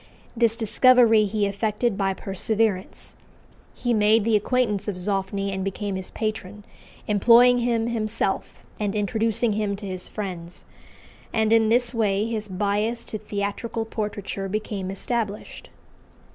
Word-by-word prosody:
This 230 -1 +2
discovery 230 0 +5
he 210 0 0
effected 210 +2 -1
by 195 -1 0
perseverance: 200 0 -1 0.6
he 240 -1 -1
made 215 0 +4
the 225 -1 +3
acquaintance 210 -2 0
of 205 - -2
Zoffany 195 +1 -2
and 190 0 -3
became 195 +1 -3
his 190 -1 -4
patron, 210 -2 -5 0.4
employing 240 +4 +6
him 235 -2 0
himself 220 -3 -2
and 205 -1 -1
introducing 220 +2 0
him 205 -1 -1
to 200 +1 -9
his 185 -2 -5
friends; 180 -4 -6 0.7
and 220 0 +2
in 225 -1 +4
this 240 +1 +2
way 210 -3 +1
his 220 -2 -3
bias 210 +4 -1
to 215 - -5
theatrical 210 +2 -3
portraiture 205 -3 -4
became 205 -2 -3
established. 210 +1 -4
210 Hz, 130 wpm, -24 LUFS, 200-225 Hz, 0.7 s, employing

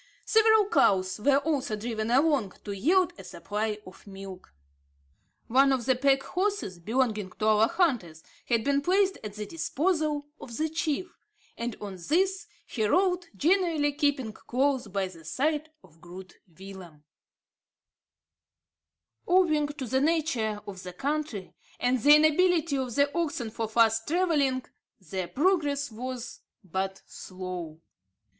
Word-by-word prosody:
Several 440 -2 +5
cows 190 - +2
were 275 +5 +4
also 280 -6 -1
driven 220 0 -3
along 265 - +2
to 205 - -6
yield 345 - +2
a - - -9
supply 210 +1 -3
of 185 +2 -14
milk. 195 -1 -10 0.9
One 270 +3 +4
of 260 -3 0
the 260 0 +3
pack 270 +1 +2
horses 370 - -2
belonging 215 0 -1
to 215 - -3
our 215 +1 +5
hunters 240 - 0 0.2
had 230 -2 +1
been 280 +2 +1
placed 380 +4 +2
at 210 -1 -7
the 210 0 -5
disposal 315 - -1
of 235 -2 -8
the 315 0 0
chief; 320 +2 -2 0.4
and 235 -1 -4
on 200 -2 -7
this 380 +4 +1 0.2
he 220 - -3
rode, 360 - +2
generally 330 - +2
keeping 285 -6 0
close 260 +1 -1
by 195 -1 -2
the 170 -3 -13
side 300 - -1
of 165 -3 -21
Groot 180 +1 -11
Willem. 180 -3 -12 2.2
Owing 335 -5 +3
to 290 -2 -6
the 260 +3 0
nature 280 -10 0
of 190 -2 -8
the 180 -1 -8
country, 280 - -3 0.3
and 245 0 +1
the 290 +5 +8
inability 315 0 +3
of 255 -3 -3
the 285 +1 +2
oxen 290 -9 -2
for 225 0 -3
fast 225 0 +3
travelling, 295 -7 +1 0.3
their 185 0 -5
progress 290 - +1
was 250 +2 -6 0.2
but 190 +1 -4
slow. 180 -4 -7
260 Hz, 135 wpm, -28 LUFS, 205-310 Hz, 2.2 s, the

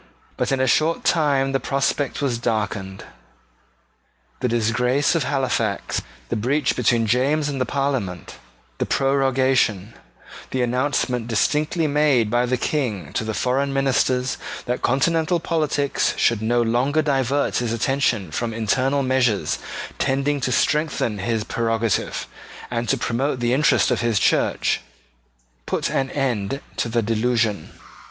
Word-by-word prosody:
But - - -1
in 135 - +1
a 130 - +3
short 155 +5 +2
time 140 -5 +2
the 135 - +1
prospect 140 +2 -1
was 125 -4 0
darkened. 105 -4 -2 1.4
The - - 0
disgrace 125 +5 +1
of 165 -5 0
Halifax, 130 -7 -1 0.3
the - - -1
breach 130 +6 0
between 115 -1 +2
James 135 +7 +1
and 140 -3 -3
the 130 - 0
Parliament, 135 -11 -2 0.4
the - - -1
prorogation: 130 -6 +1 0.6
the 130 -1 0
announcement 125 -1 0
distinctly 150 +8 +1
made 145 -7 +2
by 120 +1 +2
the 130 +1 +1
King 110 - -2
to - - -1
the 110 -1 -3
foreign 135 +2 0
ministers 130 -1 +1 0.3
that 125 0 -2
continental 160 +6 +1
politics 150 -4 0
should 115 -3 +2
no 120 +2 +2
longer 130 +7 +1
divert 140 -1 +1
his 120 -2 -1
attention 115 - 0
from 115 +7 -3
internal 130 +5 +1
measures 130 -5 +1 0.4
tending 140 +1 0
to 130 - -1
strengthen 150 -6 0
his 115 +2 -1
prerogative 115 -1 -1 0.5
and 120 -1 -2
to - - +2
promote 130 +3 -1
the 120 0 +1
interest 145 -1 +3
of 125 - +1
his 115 -2 +1
Church, - - +1 0.9
put - - -1
an 135 0 0
end 130 -3 -1 0.2
to 115 - -1
the 115 0 0
delusion. 115 -4 0
125 Hz, 135 wpm, -22 LUFS, 115-140 Hz, 1.4 s, a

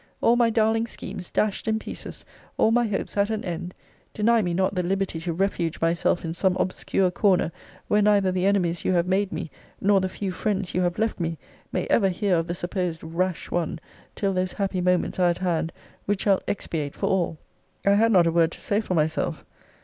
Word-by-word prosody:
All 235 - +4
my 240 -1 +4
darling 225 0 +2
schemes 180 -5 -7
dashed 215 +1 0
in 220 0 +2
pieces, - - -5 0.3
all 220 - +4
my 240 0 +3
hopes 205 0 -3
at 200 +1 +3
an 220 -1 -2
end; 175 0 -5 0.4
deny 230 +2 +3
me 175 -4 -1
not 190 +3 +1
the 185 - 0
liberty 190 -1 -1
to 170 +1 -3
refuge 170 -2 -1
myself 170 +1 +1
in 165 - -3
some 185 +1 +1
obscure 185 0 0
corner, 185 -3 +2 0.4
where 210 - +3
neither 200 -2 +4
the 185 +1 +1
enemies 175 -4 +1
you - - +1
have 170 -1 +2
made 190 +2 +1
me, 165 - -5 0.3
nor 200 -1 +3
the 185 - -1
few 190 0 -4
friends 195 0 -2
you 180 - +1
have 175 -1 0
left 220 -1 0
me, 165 -1 -2 0.3
may - - -1
ever 195 -4 +4
hear 190 +1 +1
of 165 0 -1
the 175 - -2
supposed 175 -2 -3
rash 170 +2 -2
one, 170 -3 -1 0.4
till 195 -1 0
those 185 0 -1
happy 195 -2 -1
moments 180 +1 +1
are 180 -1 +4
at 175 - 0
hand, 170 -3 -1 0.4
which 200 -1 0
shall 195 -3 +3
expiate 155 -7 -3
for - - -2
all! 175 -4 0 0.5
I 200 - +5
had 225 +3 +4
not 180 -5 +5
a 165 - +2
word 165 -1 +3
to - - -10
say 205 +1 0
for 185 -4 -2
myself. 155 0 0
185 Hz, 210 wpm, -25 LUFS, 175-205 Hz, 0.5 s, I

